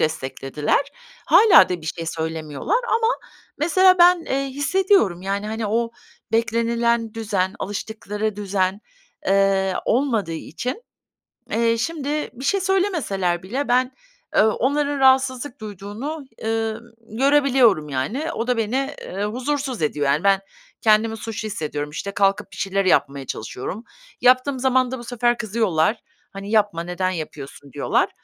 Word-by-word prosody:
desteklediler. 145 -1 -1 0.5
Hâlâ 380 - +7
da 180 -1 -3
bir 155 - -10
şey 165 +1 -4
söylemiyorlar 160 - -2
ama 450 0 +2 0.5
mesela 370 +4 +4
ben, 350 -1 +6
eee, 275 +1 -1
hissediyorum. 285 - +2
Yani, 200 +2 -2
hani, 220 0 -3
o 230 +2 0 0.4
beklenilen 230 0 +1
düzen, 200 -4 -1
alıştıkları 210 +1 -4
düzen, 195 -1 -1 0.5
eee, 195 -1 +2
olmadığı 230 -8 +1
için, 245 - -5 0.7
eee, 230 0 +1
şimdi 300 +2 -2
bir 255 +1 -9
şey 395 +8 +2
söylemeseler 325 - 0
bile 255 +10 -3
ben, 250 +1 +2 0.4
eee, - - +7
onların 285 +6 +1
rahatsızlık 260 -1 +2
duyduğunu, 215 - -6 0.2
ııı, 225 0 -1 0.4
görebiliyorum 265 - +4
yani. 225 - -2
O 230 - -3
da 250 -1 +1
beni, 265 +6 -1
eee, 195 +2 -4
huzursuz 255 - -2
ediyor, 150 -1 0
yani. 145 +6 +1
Ben 195 -1 +4 0.4
kendimi 220 0 +3
suçlu 225 0 -5
hissediyorum. 150 -7 -4
İşte, 185 +6 -5
kalkıp 195 0 +1
bir - - -11
şeyler 195 0 -1
yapmaya 140 -6 +1
çalışıyorum. 125 - -6 0.4
Yaptığım 255 +2 +3
zaman 255 -1 +2
da 260 - -4
bu 240 - -9
sefer 240 0 0
kızıyorlar. 210 -4 +1 0.4
Hani, 200 0 -7
"Yapma. 205 -6 +2
Neden 180 +2 -2
yapıyorsun?" 145 -5 -7
diyorlar. - - +1
220 Hz, 135 wpm, -22 LUFS, 190-260 Hz, 0.7 s, Hâlâ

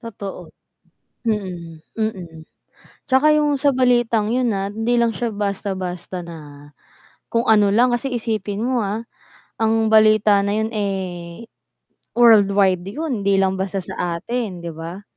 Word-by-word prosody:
Totoo, 205 -4 -8 0.8
mhm, 180 -7 -3 0.2
mm. 185 -7 -4 0.7
'Tsaka 275 +3 +4
'yong 295 -1 +2
sa 280 +1 +2
balitang 240 -4 +2
'yon, 250 -2 +1
ah, 195 0 -2
hindi 225 +4 0
lang 230 -1 +1
siya 235 -2 -2
basta-basta 190 -3 -4
na 150 -4 -11 0.6
kung 230 0 0
ano 210 -3 +4
lang. 240 +5 +3
Kasi 240 +3 -1
isipin 215 -2 -2
mo 250 -1 0
ah, 210 +1 -2 0.6
ang 225 0 +2
balita 215 -2 +5
na 200 +1 -1
'yon, 220 +1 -1
eh, 190 -1 -4 0.7
worldwide 200 -6 +4
'yon. 250 +1 -3
Hindi 200 - +3
lang 190 0 +1
basta 195 +1 -2
sa 170 -1 -3
atin, 215 -4 -4
'di 170 - -5
ba? 170 +4 -7
210 Hz, 140 wpm, -20 LUFS, 190-230 Hz, 0.8 s, balita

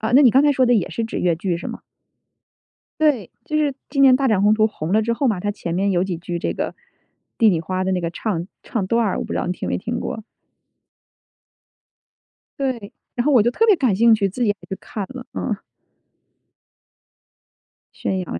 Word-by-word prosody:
啊， 220 +1 -1
那 275 - +8
你 255 - +7
刚 270 +4 +5
才 295 - +5
说 260 -2 +3
的 245 - +4
也 210 - +1
是 230 - -3
指 225 - -4
粤 175 -2 +2
剧 175 0 -2
是 - - -7
吗？ - - -6 1.2
对， 280 - +2
就 305 - -2
是 295 -3 +1 0.2
今 275 - +1
年 270 -2 +8
《大 275 0 +1
展 215 -5 +2
宏 205 +1 +5
图》 215 0 +2
红 170 -4 -4
了 215 - +4
之 230 +2 0
后 270 +4 0
嘛， 210 -6 0
它 205 +3 -1
前 175 -5 -5
面 195 +2 +1
有 180 -1 +2
几 190 -2 -3
句 175 +1 -4
这 - - -2
个 - - -3 0.7
《帝 225 -2 +5
女 170 -4 +1
花》 185 +3 -3
的 190 - 0
那 185 - +1
个 170 -1 -2
唱 175 -2 -3
唱 215 -6 -3
段 230 +1 +2
儿， 200 - 0
我 - - -2
不 - - -5
知 - - -1
道 - - -2
你 - - 0
听 180 - -5
没 - - 0
听 235 +5 -3
过？ 220 - -5 2.4
对， 250 -7 -3 0.2
然 240 - -1
后 300 - +3
我 245 - +7
就 235 - +3
特 450 - +2
别 425 -3 +6
感 255 - +1
兴 230 +3 +5
趣， 200 -3 +2
自 225 +7 -7
己 225 - +2
也 - - +3 0.2
去 190 - -3
看 205 -3 -5
了， 255 -1 -8
嗯。 225 - -2 2.4
宣 190 - -2
扬 125 - -5
215 Hz, 240 characters per minute, -21 LUFS, 185-250 Hz, 2.4 s, 那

